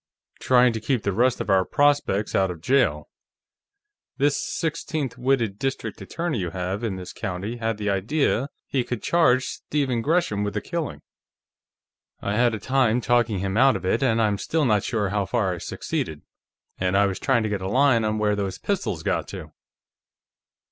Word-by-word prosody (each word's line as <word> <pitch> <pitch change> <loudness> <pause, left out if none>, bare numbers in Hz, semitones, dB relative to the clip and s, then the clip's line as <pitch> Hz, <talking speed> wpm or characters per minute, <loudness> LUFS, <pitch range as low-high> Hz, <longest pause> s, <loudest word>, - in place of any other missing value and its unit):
"Trying 125 -1 +4
to 110 - -3
keep 120 +1 -1
the 100 - 0
rest 120 +5 +2
of - - -2
our 95 -1 +4
prospects 145 -6 +1
out 95 -1 +2
of 90 -2 -6
jail. 135 +11 +1 1.1
This 145 +1 +2
sixteenth 155 -5 -3
witted 125 -5 0
District 135 0 -3
Attorney 165 -8 -3
you 90 -2 -2
have 95 +5 -4
in 110 -5 -1
this 90 -1 -8
county 95 +6 -4
had 115 -2 -2
the 105 -1 -1
idea 130 +6 0 0.2
he 130 -3 -1
could 120 -2 -5
charge 130 -7 +3
Stephen 135 -5 -2
Gresham 145 - +1
with 100 0 -3
the - - +1
killing. 155 - -4 1.2
I 100 - -2
had 120 0 +3
a - - -6
time 125 -1 +2
talking 120 -2 +2
him 95 +1 -2
out 135 +2 +5
of - - -4
it, 95 - +1
and 115 -4 +2
I'm 105 -3 +1
still 160 -2 0
not 105 -5 +2
sure 105 -4 -1
how 100 -1 -1
far 105 -7 0
I 85 - -6
succeeded. 80 -1 -4 0.6
And 95 +1 +1
I 100 - +5
was 95 -2 -2
trying 125 -4 +2
to 110 - -1
get 100 -2 -2
a 95 - -3
line 130 -1 +4
on 110 0 0
where 105 -1 +1
those 100 -2 -3
pistols - - -2
got - - -1
to." - - -8
115 Hz, 185 wpm, -24 LUFS, 100-130 Hz, 1.2 s, out